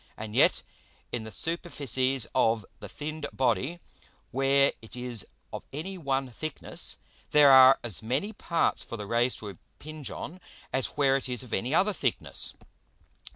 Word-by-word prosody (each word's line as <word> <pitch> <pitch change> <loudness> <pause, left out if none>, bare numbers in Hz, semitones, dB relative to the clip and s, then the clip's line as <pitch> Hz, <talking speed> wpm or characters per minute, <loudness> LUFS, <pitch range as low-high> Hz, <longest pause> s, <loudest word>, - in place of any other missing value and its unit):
And 110 0 -6
yet - - +4 0.5
in 115 -2 -3
the - - -6
Superficies 135 - 0
of 110 -2 +2
the - - -8
thinned 155 0 -5
Body, 130 - 0 0.5
where 135 +1 +3
it 110 - -7
is 125 -3 -3 0.3
of - - -7
any 165 +7 -5
one 135 -6 -1
thickness, 155 +5 -4 0.3
there 145 -2 +7
are 130 0 +9
as 105 -9 -4
many 135 - -1
parts 170 -4 0
for 115 - -7
the 105 - -6
Rays 120 +4 +2
to 105 - -7
impinge 145 - -9
on, 180 - -7 0.3
as 135 -1 +1
where 135 -1 +4
it 135 - -5
is 125 0 -2
of 125 - -10
any 125 +9 0
other 205 +4 +3
thickness. 130 -9 0
135 Hz, 155 wpm, -28 LUFS, 120-150 Hz, 0.5 s, are